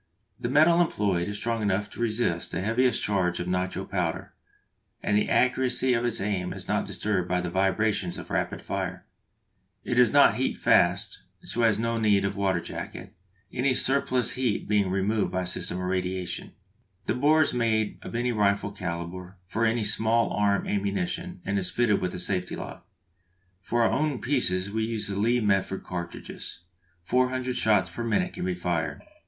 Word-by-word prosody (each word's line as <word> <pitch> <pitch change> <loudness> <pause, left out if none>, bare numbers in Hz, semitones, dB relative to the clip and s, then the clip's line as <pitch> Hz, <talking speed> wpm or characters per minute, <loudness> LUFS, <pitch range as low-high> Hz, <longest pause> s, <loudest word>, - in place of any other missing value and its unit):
The 120 - -2
metal 160 +5 +5
employed 100 - 0
is 105 0 -4
strong 115 +1 -2
enough 100 0 0
to - - -11
resist 110 -7 0
the - - -2
heaviest 120 +5 +1
charge 90 -4 0
of 90 - -3
nitro 90 0 -2
powder, - - -3 0.7
and 105 - +1
the 105 - +2
accuracy 130 0 +3
of 120 0 0
its 120 -1 0
aim 95 -3 -2
is - - -7
not - - 0
disturbed 95 -4 -1
by 90 0 +1
the 90 -1 -3
vibrations 95 0 +1
of - - -9
rapid - - -2
fire. - - -4 0.8
It - - -2
does 120 -3 +4
not 140 -6 +6
heat 130 - -1
fast, - - +2 0.2
so 120 - -2
has 110 -3 +4
no 115 +1 -1
need 105 -3 +3
of 100 0 -2
a - - -7
water 95 -3 +1
jacket, - - -7 0.4
any 130 +1 +1
surplus 130 -2 +2
heat 125 -5 -1
being 100 -2 +2
removed 100 +3 0
by 95 0 -1
a - - -4
system 90 0 -3
of 90 - -4
radiation. 90 0 -3 0.5
The - - 0
bore 155 +4 +4
is - - 0
made 110 -3 0
of - - -8
any 120 +1 0
rifle 100 -2 +1
calibre 90 -1 -6
for 110 +5 -1
any 115 0 0
small 110 +2 +2
arm 100 -1 +1
ammunition, 175 - -2
and 100 0 0
is 90 - -1
fitted 120 -4 +2
with 90 -1 -2
a - - -4
safety 90 0 -1
lock. - - -9 0.7
For 120 +5 +1
our - - +3
own 150 -3 0
pieces 100 -7 0
we 110 +1 -1
use 110 -1 -1
the 100 -1 -3
Lee 120 +3 +2
Metford 95 -2 0
cartridges. 85 -1 -6 0.4
Four 125 +7 +2
hundred 130 -1 -2
shots 105 -4 +3
per 120 - -5
minute 180 +11 0
can - - -4
be 90 -1 -1
fired. 85 -2 -2
105 Hz, 185 wpm, -27 LUFS, 95-120 Hz, 0.8 s, not